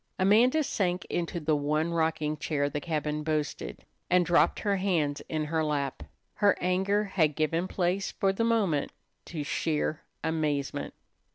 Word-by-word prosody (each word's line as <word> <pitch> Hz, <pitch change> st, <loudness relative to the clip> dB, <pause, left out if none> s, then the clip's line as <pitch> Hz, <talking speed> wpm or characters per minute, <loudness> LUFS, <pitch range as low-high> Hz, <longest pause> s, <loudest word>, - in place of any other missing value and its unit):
Amanda 230 Hz, +10 st, +4 dB
sank 180 Hz, -8 st, -1 dB
into 170 Hz, 0 st, -2 dB
the 155 Hz, -1 st, +1 dB
one 155 Hz, +3 st, 0 dB
rocking 160 Hz, -2 st, 0 dB
chair 145 Hz, -2 st, -1 dB
the 145 Hz, -, -3 dB
cabin 150 Hz, -1 st, -2 dB
boasted, 150 Hz, -, -3 dB, 0.2 s
and 180 Hz, 0 st, +4 dB
dropped 175 Hz, 0 st, +3 dB
her 200 Hz, -2 st, +1 dB
hands 165 Hz, -7 st, 0 dB
in 155 Hz, -1 st, -1 dB
her 160 Hz, +1 st, 0 dB
lap. 145 Hz, -3 st, -1 dB, 0.4 s
Her 205 Hz, -2 st, +4 dB
anger 190 Hz, +3 st, +1 dB
had 165 Hz, -7 st, +1 dB
given 165 Hz, +3 st, 0 dB
place 185 Hz, +1 st, -1 dB
for 195 Hz, -1 st, +1 dB
the 230 Hz, -, 0 dB
moment 205 Hz, -11 st, +1 dB, 0.3 s
to 155 Hz, -4 st, -4 dB
sheer 155 Hz, +1 st, -1 dB, 0.2 s
amazement. 150 Hz, -4 st, -1 dB
160 Hz, 150 wpm, -29 LUFS, 150-185 Hz, 0.4 s, Amanda